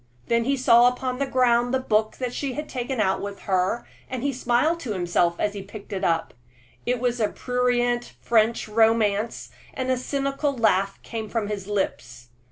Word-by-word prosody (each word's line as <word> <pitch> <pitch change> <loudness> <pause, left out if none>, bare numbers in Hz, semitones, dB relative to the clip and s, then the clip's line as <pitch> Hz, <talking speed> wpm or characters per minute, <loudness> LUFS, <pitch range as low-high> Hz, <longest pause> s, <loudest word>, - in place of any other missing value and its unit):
Then 235 0 +2
he 275 +1 +1
saw 240 -1 +6
upon 250 +1 -1
the 275 - 0
ground 245 -2 +3
the - - +2
book 215 -3 +1 0.2
she 270 +1 -3
had 300 +4 -5
taken 255 0 -3
out 190 -3 +1
with 200 0 -6
her, 190 +4 0 0.2
and 260 +2 -2
smiled 255 +7 +1
to 245 -9 -4
himself 175 -2 +1
as 205 - 0
he 200 - -5
picked 200 +1 -10
it 190 - -3
up. 165 -1 0 0.5
It 250 0 +1
was 245 0 0
a 215 - +3
prurient 245 -1 0
French 230 0 +2
romance, 220 0 +1 0.2
and 260 0 -1
a 255 - +2
cynical 275 +2 -1
laugh 195 -3 +2
came 220 -2 -5
from 220 -2 -2
his 200 -2 -4
lips. 125 -12 -3
235 Hz, 175 wpm, -24 LUFS, 205-250 Hz, 0.5 s, saw